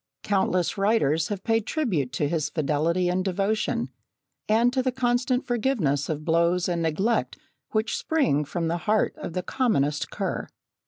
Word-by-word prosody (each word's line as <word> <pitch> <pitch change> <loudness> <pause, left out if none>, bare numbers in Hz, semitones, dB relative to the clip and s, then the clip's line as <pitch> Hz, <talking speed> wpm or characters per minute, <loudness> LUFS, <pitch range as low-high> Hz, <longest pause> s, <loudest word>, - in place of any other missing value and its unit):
Countless 190 -2 0
writers 175 -7 +2
have 200 -2 -4
paid 225 -1 +1
tribute 185 - -1
to 145 0 0
his 155 -1 -1
fidelity 160 +4 0
and 180 +1 0
devotion, 200 +3 -1 0.6
and 235 +3 +3
to 260 - +2
the 255 0 0
constant 250 0 0
forgiveness 215 - 0
of 155 -1 -3
blows 170 +2 +2
and 175 -2 -1
neglect 190 +9 0 0.3
which 220 0 0
spring 270 - +1
from 165 +3 -3
the 170 +1 0
heart 215 0 +2
of 170 - -6
the 180 - -2
commonest 155 - 0
cur. - - -3
185 Hz, 155 wpm, -25 LUFS, 160-230 Hz, 0.6 s, and